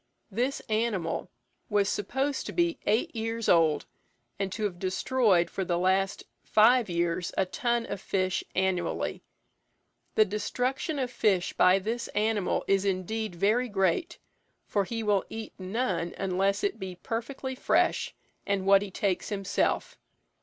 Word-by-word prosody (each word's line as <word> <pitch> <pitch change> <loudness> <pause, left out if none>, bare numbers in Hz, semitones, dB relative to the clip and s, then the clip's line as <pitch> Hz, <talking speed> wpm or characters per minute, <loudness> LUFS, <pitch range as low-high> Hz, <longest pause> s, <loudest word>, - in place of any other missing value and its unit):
This 250 +7 -1
animal 215 -7 -1 0.4
was 205 -2 +2
supposed 265 +9 -1
to - - -4
be 345 -1 +1
eight 215 +3 +1
years 225 0 -2
old, 160 -3 +4 0.5
and 195 -1 -1
to 215 +3 -4
have 185 -4 -2
destroyed 185 -1 +2
for 190 - -3
the 175 -1 0
last 190 +2 +1 0.2
five 230 +1 +5
years 170 0 -1
a 190 - +3
ton 240 +4 -1
of 200 -3 -5
fish 185 -2 0
annually. 190 -1 -1 0.9
The 215 - +6
destruction 250 - -2
of 255 -2 -1
fish 195 -7 +1
by 185 +1 +5
this 225 +5 -3
animal 210 -2 +1
is, 195 0 +3
indeed, 200 +1 -2
very 220 +8 +2
great, 205 - 0 0.5
for 200 -2 0
he 225 +2 -3
will 205 -2 +2
eat 225 0 -7
none 185 -3 -2
unless 195 +1 0
it 400 - -1
be 190 -2 -5
perfectly 240 +7 -4
fresh, 255 - +1 0.3
and 200 -1 -1
what 195 0 +6
he 205 - -4
takes 190 -1 -1
himself. 195 -2 -1
200 Hz, 145 wpm, -28 LUFS, 185-230 Hz, 0.9 s, The